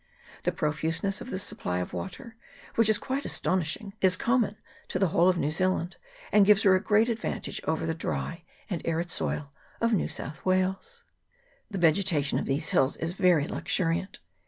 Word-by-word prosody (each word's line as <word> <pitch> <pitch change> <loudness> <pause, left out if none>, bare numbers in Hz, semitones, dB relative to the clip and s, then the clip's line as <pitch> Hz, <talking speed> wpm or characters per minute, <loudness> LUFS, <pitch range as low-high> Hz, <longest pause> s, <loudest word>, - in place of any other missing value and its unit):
The - - +3
profuseness 165 +6 -1
of - - -7
this 185 -2 0
supply 90 - -2
of 90 - -4
water, 220 +4 -6 0.4
which 230 -1 +4
is 215 - +4
quite 270 +2 -3
astonishing, 185 +3 -1
is 185 -1 +4
common 235 -3 +1 0.3
to - - -2
the 190 -1 +2
whole 170 +3 +4
of 180 - +2
New 150 - 0
Zealand, 185 +1 0 0.3
and 210 - +6
gives 210 +1 +5
her 195 -3 +6
a 185 - +3
great 215 +1 +3
advantage 230 -2 -3
over 160 0 -1
the 165 - 0
dry 165 +1 -3 0.3
and 180 -8 -3
arid 170 +1 -1
soil 145 -5 -2 0.3
of 230 0 +2
New 205 - +1
South 150 +3 -6
Wales. 190 - -1 0.7
The 200 - -4
vegetation 165 -4 +2
of - - -3
these 140 +3 0
hills 135 +1 +2
is 165 +1 -2
very 180 -6 +3
luxuriant. 170 +2 -1
185 Hz, 180 wpm, -28 LUFS, 160-205 Hz, 0.7 s, and